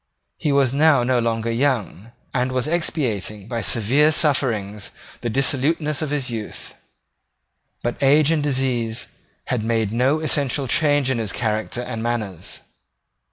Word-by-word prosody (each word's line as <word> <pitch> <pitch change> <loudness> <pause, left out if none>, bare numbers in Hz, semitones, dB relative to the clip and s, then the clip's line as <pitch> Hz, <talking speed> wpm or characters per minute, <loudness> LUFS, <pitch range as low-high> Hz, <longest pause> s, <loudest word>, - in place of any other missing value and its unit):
He 150 - 0
was 140 -2 +2
now 145 -3 +4
no 125 0 +2
longer 115 0 -1
young, 115 -4 -1 0.2
and 125 0 0
was 130 +1 -1
expiating 115 - -2
by 115 -1 -3
severe 130 +8 +3
sufferings 115 - +1 0.3
the 120 - -2
dissoluteness 145 +4 0
of 155 - -2
his 140 -4 -2
youth: 110 -2 -6 1.1
but 120 0 -3
age 145 +3 +4
and 160 -2 +1
disease 125 -5 -1 0.4
had 120 -4 -2
made 110 -2 0
no 130 +6 +2
essential 145 -3 +1
change 145 0 +2
in 125 - -1
his 110 -3 -2
character 110 +1 -2
and 115 -2 -5
manners. 110 -7 -4
125 Hz, 140 wpm, -21 LUFS, 115-145 Hz, 1.1 s, now